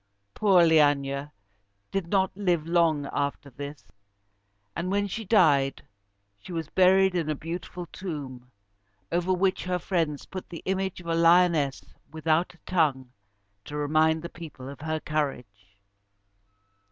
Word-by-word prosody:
Poor 195 -5 +4
Leæna 145 -3 +3 0.6
did 195 -3 -2
not 190 0 +1
live 180 -6 0
long 165 -4 +2
after 140 0 -2
this; 145 +3 -8 0.9
and 180 - -2
when 205 +1 +1
she 215 +3 -4
died, 150 -10 +3 0.6
she 140 - -11
was 165 -3 -4
buried 190 0 +4
in 165 -4 -1
a 155 - 0
beautiful 175 +3 -6
tomb, 140 -9 -7 0.6
over 175 +2 0
which 185 +1 +1
her 180 0 0
friends 165 -5 -1
put 185 -1 -8
the 170 - -8
image 190 -1 -1
of - - -15
a 165 - -1
lioness 165 -4 +4 0.3
without 160 +2 0
a - - -26
tongue, 140 -8 +1 0.5
to 150 - -7
remind 155 +2 +2
the - - -4
people 155 -6 -10
of 140 0 -10
her 155 +1 -2
courage. 115 -11 -4
165 Hz, 140 wpm, -27 LUFS, 145-180 Hz, 0.9 s, Poor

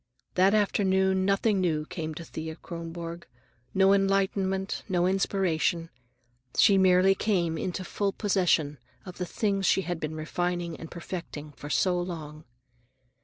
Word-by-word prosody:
That 190 +3 +4
afternoon 190 -2 +2
nothing 195 0 +2
new 155 -4 0
came 155 -1 -5
to 170 - -7
Thea 160 0 -6
Kronborg, 170 0 -7 0.5
no 195 0 +5
enlightenment, 195 0 +1
no 175 -2 +2
inspiration. 180 -3 0 0.7
She 200 - +6
merely 185 +1 +5
came 180 -6 0
into 180 +3 -3
full 200 +2 -1
possession 175 - +1 0.3
of 180 -2 -9
things 195 +2 -1
she - - +4
had 175 -2 -3
been 155 0 -4
refining 175 +1 -2
and 165 - -9
perfecting 165 -4 -7
for 145 0 -10
so 180 +3 +2
long. 155 -4 -7
180 Hz, 130 wpm, -28 LUFS, 165-195 Hz, 0.7 s, She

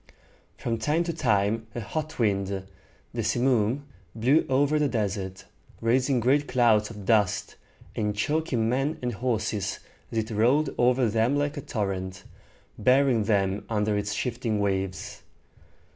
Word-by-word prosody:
From 115 -1 -2
time 150 +9 +1
to 170 -1 -3
time 110 -5 +1
a - - -2
hot 155 +8 -4
wind, 100 -4 +1 0.7
the - - -2
simoom, 125 +1 +1 0.3
blew 130 +8 +3
over 145 +3 +3
the 150 - +2
desert, 100 -6 -3 0.3
raising 125 +3 +2
great 140 +5 +2
clouds 110 -4 +3
of 105 -3 -9
dust, 105 -3 +1 0.4
and 105 -1 -1
choking 130 -1 0
men 135 +6 0
and 125 -1 -1
horses 110 -3 -1 0.3
as 115 - -4
it 110 0 -1
rolled 130 +8 +2
over 125 0 +4
them 115 +5 +2
like 145 0 0
a 145 - -4
torrent, 95 -5 -3 0.6
burying 125 -1 +3
them 100 -2 +1
under 105 -1 +1
its 105 0 -1
shifting 115 -1 -2
waves. 95 -1 -2
115 Hz, 140 wpm, -26 LUFS, 105-130 Hz, 0.7 s, over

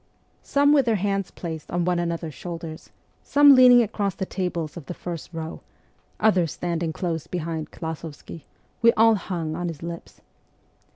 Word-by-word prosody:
Some 285 +1 +3
with 275 -4 +3
their 225 - +3
hands 195 -1 -1
placed 160 -3 -7
on 175 0 -1
one 180 -1 +1
another's 170 -2 -3
shoulders, 165 -1 -8 0.3
some 285 0 +6
leaning 250 -2 +8
across 200 -3 -2
the 190 - -3
tables 175 -5 -3
of 165 -6 -9
the 180 - -5
first 170 -2 -7
row, 165 -1 -6 0.6
others 185 -8 +2
stand 170 -1 -3
ing 165 -2 -1
close 165 -1 -3
behind 165 -3 -4
Klasovsky, 160 -1 -8 0.4
we 230 0 +7
all 225 +1 +5
hung 170 -6 -3
on 175 +1 -3
his 165 -2 -6
lips. 170 0 -8
175 Hz, 165 wpm, -24 LUFS, 165-200 Hz, 0.6 s, leaning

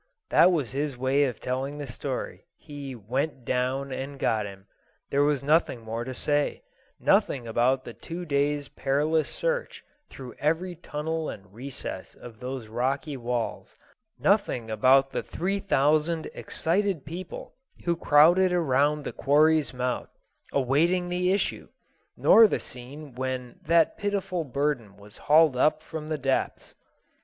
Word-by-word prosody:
That 185 - +6
was 150 -9 -1
his 140 0 -2
way 135 +3 +2
of 125 -5 -4
telling 135 +3 -3
the 145 - -5
story: 120 -5 -5
he 140 -3 -8
"went 130 +4 -3
down 130 +3 -1
and 135 +2 -5
got 110 -5 0
him." 95 -1 -12 0.5
There 140 - +3
was 145 -2 +2
nothing 150 -4 +2
more 115 +1 -4
to 130 +2 -5
say; 145 - 0 0.4
nothing 145 - +2
about 125 +3 +2
the 120 - -8
two 175 +7 -7
days' 145 -1 0
perilous 150 +3 0
search - - -2 0.3
through 130 -2 -9
every 165 +4 0
tunnel 160 -1 -4
and 100 -1 -10
recess 130 +4 -7
of 115 -3 -12
those 130 -1 -5
rocky 135 +6 -2
walls; 120 -2 -3 0.4
nothing 130 - +1
about 135 +4 +4
the - - -2
three 195 +4 -2
thousand 155 -2 +1
excited 185 -2 -1
people 170 +4 -7 0.3
who 170 -1 +2
crowded 170 +4 +5
around 150 -3 +2
the - - -5
quarry's 155 +1 +3
mouth, 125 -1 -2 0.4
awaiting 165 +7 +2
the 180 +1 +1
issue, 200 - -1 0.5
nor 225 -1 +7
the - - -1
scene 135 +3 -9
when 130 -1 -4
that 165 -1 +2
pitiful 200 -4 -1
burden 135 -7 -2
was 105 0 -15
hauled 155 -2 +5
up 155 +4 +2
from 160 -2 -7
the 155 -1 -2
depths. 135 -1 -2
140 Hz, 145 wpm, -27 LUFS, 130-160 Hz, 0.5 s, nor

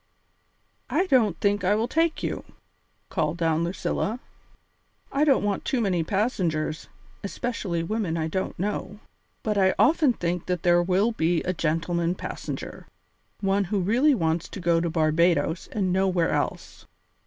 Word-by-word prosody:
"I 370 - +2
don't 225 - +2
think 200 -1 +1
I 195 +3 +3
will 225 +2 0
take 325 +4 0
you," - - -3 0.7
called 150 +2 -1
down 165 -1 +1
Lucilla. 190 +6 -2 0.9
"I 280 +2 +2
don't 280 -7 +3
want 205 -1 -1
too 265 - 0
many 185 -7 +1
passengers, 165 -6 -1 0.4
especially 200 -5 -3
women 185 -3 -2
I 160 -1 -1
don't 185 +4 -3
know. 205 +2 -3 0.4
But 210 -2 0
I 190 -1 +3
often 305 -5 +4
think 175 -3 -3
there 175 -1 +3
will 190 +6 +2
be 170 -5 0
a 185 - -1
gentleman 170 +1 0
passenger - - -6 0.5
one 195 0 +1
who 200 +3 -1
really 245 +10 +3
wants 165 -3 -1
to - - -7
go 170 -2 +2
to 170 - -1
Barbadoes 165 +1 +1
and 190 -4 0
nowhere 185 -3 +2
else. - - -3
185 Hz, 145 wpm, -25 LUFS, 170-210 Hz, 0.9 s, often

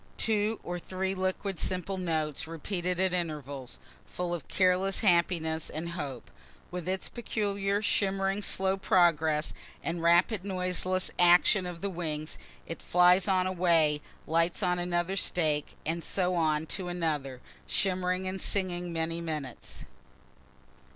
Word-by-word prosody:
Two 215 0 +1
or 175 0 -4
three 190 +2 -3
liquid 190 0 -2
simple 185 +1 0
notes, 160 -4 -2
repeated 175 +2 -3
at 190 -1 +2
intervals, 145 -7 -4 0.3
full 180 -1 -3
of 170 -5 -5
careless 185 +1 +2
happiness 170 -5 +2
and 160 +2 -4
hope. 140 -8 -6 0.4
With 180 0 -4
its 190 0 -2
peculiar 205 -3 -2
shimmering 195 -1 +1
slow 190 -1 +1
progress 160 -5 +2 0.3
and 170 0 -3
rapid 175 +4 +3
noiseless 185 -1 0
action 180 +2 +5
of 175 -1 -7
the 200 - -1
wings, 155 -3 -4 0.3
it 165 - -7
flies 180 +1 +4
on 185 -2 +3
a 185 - 0
way, 165 -5 +3 0.2
lights 165 +4 +1
on 180 -1 +2
another 175 +1 0
stake, 155 -6 0
and 165 +1 -2
so 185 -1 0
on 155 -2 +1
to 180 +3 -4
another, 150 -7 -2 0.3
shimmering 185 -1 0
and 190 0 -4
singing 180 -3 0
many 165 0 -1
minutes. 150 -6 -6
180 Hz, 135 wpm, -29 LUFS, 165-190 Hz, 0.4 s, action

